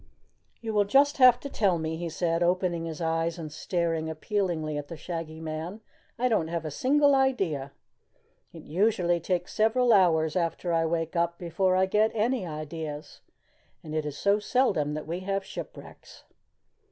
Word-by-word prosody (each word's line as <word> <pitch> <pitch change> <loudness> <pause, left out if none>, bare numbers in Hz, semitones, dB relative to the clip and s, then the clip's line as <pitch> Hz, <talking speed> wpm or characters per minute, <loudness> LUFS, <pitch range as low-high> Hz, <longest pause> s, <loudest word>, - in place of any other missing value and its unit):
"You 225 -2 -4
will 205 -1 +3
just 280 +7 +4
have 250 -2 +7
to - - -5
tell 200 -9 +1
me," 160 0 -3
he 170 +1 -4
said, 165 +1 -1
opening 175 -1 +1
his 160 0 -6
eyes 165 +1 0
and 155 -3 -7
staring 165 -1 -2
appealingly 160 -2 -2
at 145 -1 -4
the 165 - -8
Shaggy 160 -1 -6
Man. 160 +6 -5 0.4
"I 250 +1 +1
don't 215 -9 +1
have 165 -1 -3
a 155 - -4
single 285 - +3
idea. 195 - +1 0.8
It 165 -2 -11
usually 175 0 +1
takes 175 +1 -2
several 230 +2 +3
hours 160 -5 +3
after 170 0 -1
I 165 0 +2
wake 165 +1 -2
up 170 0 0
before 185 +2 0
I 190 0 +4
get 210 +3 +2
any 225 -2 0
ideas 155 -1 -6 0.6
and 155 - -8
it 155 0 0
is 145 -1 -6
so 200 +1 +2
seldom 200 - +1
that 155 - -5
we 170 +3 -4
have 195 +1 -2
shipwrecks." - - -10
170 Hz, 170 wpm, -27 LUFS, 160-205 Hz, 0.8 s, have